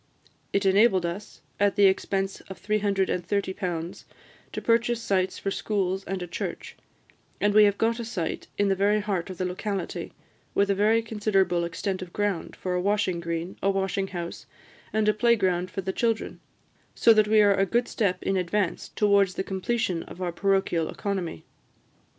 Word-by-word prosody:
It 200 0 +1
enabled 195 -1 +4
us, 175 +5 -6 0.2
at 200 -1 +3
the 205 -1 +5
expense 195 0 +1
of 190 - -8
£330, 195 -3 -1 0.5
to - - -5
purchase 235 0 +2
sites 190 -4 0
for 195 - -3
schools, 190 -2 -1
and 190 -2 -3
a - - -6
church; 170 - -5 0.6
and 205 0 +2
we 210 0 +7
have 205 -1 +2
got 230 +1 +1
a - - -3
site 215 -7 -4
in 205 - +2
the 195 - +2
very 205 +2 +2
heart 195 -4 -2
of 185 - -7
the 185 - -1
locality, 185 0 -4 0.4
with 200 0 +3
a - - +4
very 215 +3 +3
considerable 195 -5 +1
extent 185 +3 -3
of 180 -2 -8
ground 205 -4 -2
for 185 - -3
a 180 - 0
washing 195 -3 +1
green, 170 +1 -4
a 195 - +2
washing 195 0 0
house, 175 -3 -6 0.4
and 215 -1 +1
a 215 - +5
play 235 +3 +4
ground 185 -3 0
for 195 - -4
the 190 0 -3
children, 230 -2 -1 0.6
so 230 - +6
that 215 -1 +4
we 215 0 +4
are 205 -1 +6
a 195 0 +1
good 240 +4 +1
step 185 -4 -1
in 195 - 0
advance 185 +1 -1
towards 200 -3 +3
the - - -1
completion 190 -2 -1
of - - -11
our 180 -2 -2
parochial 190 -2 +1
economy." 190 - -4
195 Hz, 180 wpm, -26 LUFS, 185-210 Hz, 0.6 s, we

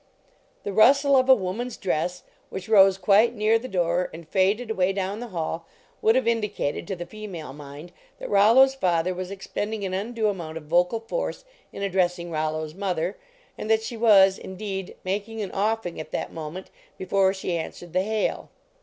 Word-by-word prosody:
" - - -38
The 200 - -4
rustle 275 +7 +5
of 260 0 +3
a 260 - +9
woman 200 +4 -3
s 245 - -8
dress, 180 -1 -2 0.3
which 190 -1 -7
rose 195 -3 +6
quite 205 +5 +4
near 215 +1 +3
the 255 - -7
door 175 -3 0
and 165 0 -11
faded 205 +6 +1
away 190 -2 +1
down 195 +2 -3
the 245 - -6
hall, 165 -3 -4 0.3
would 220 +1 +4
have 260 -3 +1
indicated 210 -10 -1
to 195 - -3
the 175 -1 -6
female 185 -9 -8
mind 145 +3 -10 0.3
that - - -7
Rollo 215 +6 +6
s 270 0 +2
father 180 -7 +1
was 185 0 -5
expending 205 +2 -4
an 185 - -3
undue 220 +3 -1
amount 170 -6 -4
of 165 - -8
vocal 175 +8 +1
force - - -4 0.3
in 200 - -6
addressing 180 -3 0
Rollo 155 0 -1
s 155 - -10
mother, 185 -1 -2 0.4
and 215 - -5
that 220 0 +3
she 235 - -5
was, 200 -4 +5
indeed, 190 -1 -6
making 205 +4 -3
an 195 - -6
offing 210 -3 -1
at 155 - -7
that - - -3
moment 165 +4 -7 0.3
before 190 0 +2
she 190 -2 -3
answered 170 +1 -6
the 185 - +3
hail. 215 +2 -2
195 Hz, 190 wpm, -25 LUFS, 175-220 Hz, 0.4 s, a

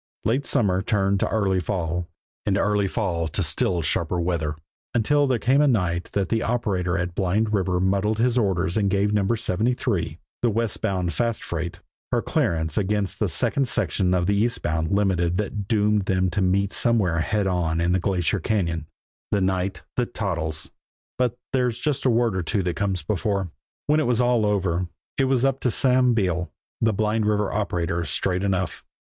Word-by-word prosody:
Late 130 +5 +1
summer 95 -5 +2
turned 100 -1 +1
to - - +1
early 100 -4 +1
fall, 90 -2 -2 0.4
and 100 -1 +2
early 105 0 +2
fall 90 -6 -1
to 75 - -2
still 90 -3 0
sharper 85 +3 0
weather, 85 -3 -1 0.4
until 145 +5 +3
there 130 -2 +2
came 130 +5 +3
the 150 - +5
night 90 -8 0
that 100 -3 0
the 115 -1 +1
operator 100 -7 0
at 85 0 -2
Blind 105 +4 0
River 95 -3 +1
muddled 100 +3 +1
his 120 +1 +2
orders 95 -6 +1
and 100 -2 +2
gave 100 +2 +1
No. 100 -2 +2
73, 110 - -1 0.2
the 120 - +3
westbound 100 -5 -1
fast 115 -2 -1
freight, 85 0 -4 0.3
her - - +2
clearance 80 0 0
against 100 -1 -1
the - - +1
second 135 -2 0
section 90 -5 +1
of 90 -1 +1
the 100 +2 +2
eastbound 85 -8 0
Limited 90 -4 +1
that 105 -1 -3
doomed 105 -2 +2
them 95 -1 +1
to 100 - 0
meet 95 +1 +1
somewhere 105 -9 +2
head 105 +5 0
on 85 -3 0
in 85 +1 +1
the 95 - +2
Glacier 90 -3 0
Cañon; 85 -7 -1 0.4
the 100 - +1
night 95 0 -1
that 120 -1 -1
Toddles 80 -6 -2 0.5
but 125 -1 +1 0.2
there's 125 -3 +1
just 140 +2 -1
a - - +5
word 115 -3 +2
or 95 - 0
two 95 +4 -1
that 90 -1 -1
comes 95 -3 -1
before. 100 -2 -1 0.3
When 150 +1 +3
it 155 - +1
was 120 -1 +2
all 120 -3 +3
over, 90 -3 0 0.3
it 135 - +4
was 130 -1 +2
up 135 0 +1
to 125 - +1
Sam 125 +1 +3
Beale, 90 -5 0 0.3
the 110 - +3
Blind 110 +1 0
River 105 -1 +1
operator, 85 -5 -1
straight 90 +5 -1
enough. 95 -2 -1
100 Hz, 180 wpm, -24 LUFS, 90-110 Hz, 0.5 s, the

